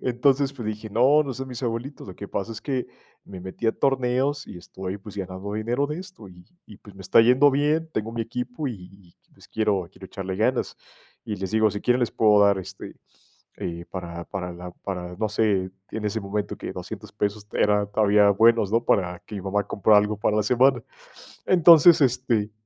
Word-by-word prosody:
entonces, 135 Hz, +3 st, +2 dB
pues, 120 Hz, -5 st, -7 dB
dije: 110 Hz, 0 st, -6 dB
“No, 130 Hz, +8 st, +4 dB
no 140 Hz, -3 st, -5 dB
son 130 Hz, 0 st, -6 dB
mis 125 Hz, -1 st, -7 dB
abuelitos. 120 Hz, +3 st, -4 dB
Lo 95 Hz, -, -9 dB
que 100 Hz, -, -9 dB
pasa 105 Hz, +4 st, -4 dB
es 105 Hz, -, -8 dB
que 130 Hz, -3 st, -2 dB, 0.4 s
me 95 Hz, -2 st, -10 dB
metí 95 Hz, +5 st, -6 dB
a 110 Hz, -, +3 dB
torneos, 135 Hz, +2 st, 0 dB
y -, -, -9 dB
estoy, 95 Hz, +2 st, -7 dB
pues, 105 Hz, +1 st, -12 dB
ganando 95 Hz, +1 st, -6 dB
dinero 120 Hz, +6 st, -1 dB
de 150 Hz, +3 st, -5 dB
esto 180 Hz, -, -11 dB
y 90 Hz, -1 st, -16 dB, 0.2 s
y, 105 Hz, -, -13 dB
pues, 105 Hz, -, -15 dB
me 95 Hz, -, -11 dB
está 95 Hz, +5 st, +5 dB
yendo 125 Hz, +5 st, +5 dB
bien, 150 Hz, +4 st, +1 dB
tengo 110 Hz, +1 st, -3 dB
mi 115 Hz, 0 st, -2 dB
equipo 125 Hz, +5 st, -5 dB
y -, -, -4 dB
y 90 Hz, -1 st, -16 dB
y, -, -, -34 dB
pues, -, -, -19 dB
quiero 100 Hz, -5 st, 0 dB
quiero 95 Hz, 0 st, -12 dB
echarle 95 Hz, -1 st, -6 dB
ganas”. 120 Hz, +5 st, 0 dB, 0.5 s
Y 105 Hz, -, -4 dB
les 95 Hz, -1 st, -5 dB
digo: 110 Hz, -1 st, +3 dB
“Si 100 Hz, -, -5 dB
quieren 125 Hz, +3 st, +2 dB
les 120 Hz, -, 0 dB
puedo 105 Hz, -2 st, +4 dB
dar, 100 Hz, -1 st, +3 dB
este, 95 Hz, +1 st, -9 dB, 0.6 s
eh, 85 Hz, 0 st, -6 dB
para 85 Hz, -2 st, -6 dB
para 90 Hz, -3 st, -5 dB
la 90 Hz, +1 st, -9 dB
para, 90 Hz, -2 st, -6 dB
no 110 Hz, +3 st, -1 dB
sé", 100 Hz, -3 st, 0 dB, 0.2 s
en 110 Hz, -, -5 dB
ese 105 Hz, +1 st, -1 dB
momento 100 Hz, +1 st, -4 dB
que -, -, -6 dB
$200 -, -, -8 dB
pesos 105 Hz, 0 st, -3 dB
era 105 Hz, 0 st, +2 dB
todavía 105 Hz, 0 st, +4 dB
buenos, 110 Hz, 0 st, +4 dB
¿no?, 115 Hz, +1 st, +2 dB
para 90 Hz, -2 st, +1 dB
que 105 Hz, -, -7 dB
mi 95 Hz, -, -6 dB
mamá 100 Hz, +1 st, -1 dB
comprara 105 Hz, +1 st, +4 dB
algo 105 Hz, 0 st, 0 dB
para 105 Hz, 0 st, +1 dB
la 105 Hz, -, +2 dB
semana. 125 Hz, +3 st, +3 dB, 0.6 s
Entonces, 170 Hz, -2 st, +7 dB
este 120 Hz, -5 st, +1 dB
105 Hz, 210 wpm, -24 LUFS, 95-125 Hz, 0.6 s, Entonces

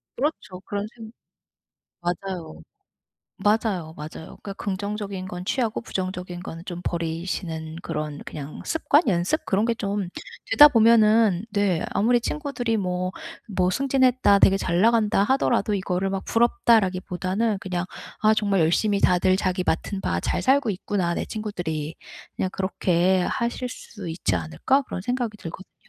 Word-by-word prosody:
그렇죠. 220 Hz, -10 st, -3 dB
그런 205 Hz, 0 st, -3 dB
생 225 Hz, -2 st, -10 dB, 0.9 s
맞아요. 175 Hz, -, -4 dB, 0.7 s
맞아요, 205 Hz, -5 st, 0 dB
맞아요. 155 Hz, +1 st, -9 dB
그러니까 200 Hz, -, -5 dB
긍정적인 200 Hz, -1 st, -4 dB
건 180 Hz, -1 st, -6 dB
취하고 230 Hz, +1 st, -1 dB
부정적인 185 Hz, -4 st, -4 dB
건 165 Hz, -3 st, -7 dB
좀 175 Hz, -1 st, -5 dB
버리시는 165 Hz, -1 st, -3 dB
그런 150 Hz, -1 st, -4 dB
그냥 145 Hz, 0 st, -7 dB
습관? 320 Hz, -1 st, +3 dB
연습? 185 Hz, -, +1 dB
그런 200 Hz, +3 st, +1 dB
게 235 Hz, 0 st, +1 dB
좀 200 Hz, -3 st, -2 dB, 0.4 s
되다 295 Hz, +6 st, +10 dB
보면은 220 Hz, -5 st, +5 dB
네 200 Hz, -5 st, +1 dB
아무리 240 Hz, +3 st, +3 dB
친구들이 245 Hz, -5 st, -2 dB
뭐 185 Hz, -2 st, -1 dB, 0.4 s
뭐 185 Hz, -2 st, +1 dB
"승진했다. 255 Hz, -4 st, +3 dB
되게 195 Hz, 0 st, +5 dB
잘 175 Hz, -2 st, 0 dB
나간다." 215 Hz, -2 st, +4 dB
하더라도 240 Hz, -4 st, +2 dB
이거를 190 Hz, 0 st, -1 dB
막 195 Hz, 0 st, -3 dB
'부럽다.'라기보다는 210 Hz, -, +2 dB
그냥 180 Hz, -2 st, -2 dB, 0.4 s
'아. 215 Hz, 0 st, +5 dB
정말 200 Hz, -3 st, +1 dB
열심히 200 Hz, +5 st, +2 dB
다들 185 Hz, +1 st, +4 dB
자기 185 Hz, -1 st, -1 dB
맡은 190 Hz, +4 st, -1 dB
바 85 Hz, -, -1 dB
잘 -, -, -1 dB
살고 265 Hz, -3 st, +3 dB
있구나 185 Hz, -2 st, -1 dB
내 -, -, -2 dB
친구들이.' 170 Hz, -8 st, -4 dB, 0.4 s
그냥 185 Hz, -, -1 dB
그렇게 185 Hz, -1 st, +1 dB
하실 235 Hz, +6 st, -2 dB
수 205 Hz, -6 st, -9 dB
있지 160 Hz, -, -1 dB
않을까? 85 Hz, -, +1 dB
그런 220 Hz, -, -6 dB
생각이 240 Hz, +1 st, -2 dB
들거든요. 180 Hz, +2 st, -9 dB
195 Hz, 320 characters per minute, -24 LUFS, 180-220 Hz, 0.9 s, 되다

